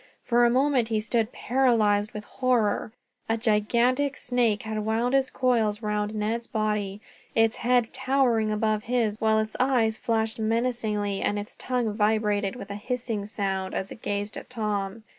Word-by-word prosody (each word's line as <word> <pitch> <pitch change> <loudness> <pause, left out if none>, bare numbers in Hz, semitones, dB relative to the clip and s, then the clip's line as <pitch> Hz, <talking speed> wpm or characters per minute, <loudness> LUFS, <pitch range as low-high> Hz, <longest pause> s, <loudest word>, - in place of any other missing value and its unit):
For 240 0 +3
a - - +5
moment 260 -1 +2
he 220 -1 0
stood, 225 +1 0
paralyzed 220 -5 +2
with 210 - -7
horror. 240 -4 0 0.4
A 225 - +2
gigantic 240 +5 +1
snake 240 -4 +1
had 220 -1 -3
wound 225 +4 0
its 270 -1 +3
coils 225 -4 +1
round 210 0 -1
Ned's 225 +2 -2
body. 210 -2 -2 0.3
Its 225 -1 +3
head 245 -1 +1
towered 260 -4 +2
above 215 0 0
his, 230 -3 0
while 220 0 +3
its 220 0 -1
eyes 240 -4 +2
flashed 225 -1 -1
menacingly, 220 -3 -1
and 205 - 0
its 205 +1 -6
tongue 245 -4 -1
vibrated 210 -1 +1
with 205 -5 -8
a - - -4
hissing 230 -4 -3
sound 195 -3 -2
as 190 - -3
it - - -10
gazed 205 0 -3
at - - -9
Tom. 210 -3 -3
220 Hz, 160 wpm, -26 LUFS, 210-240 Hz, 0.4 s, a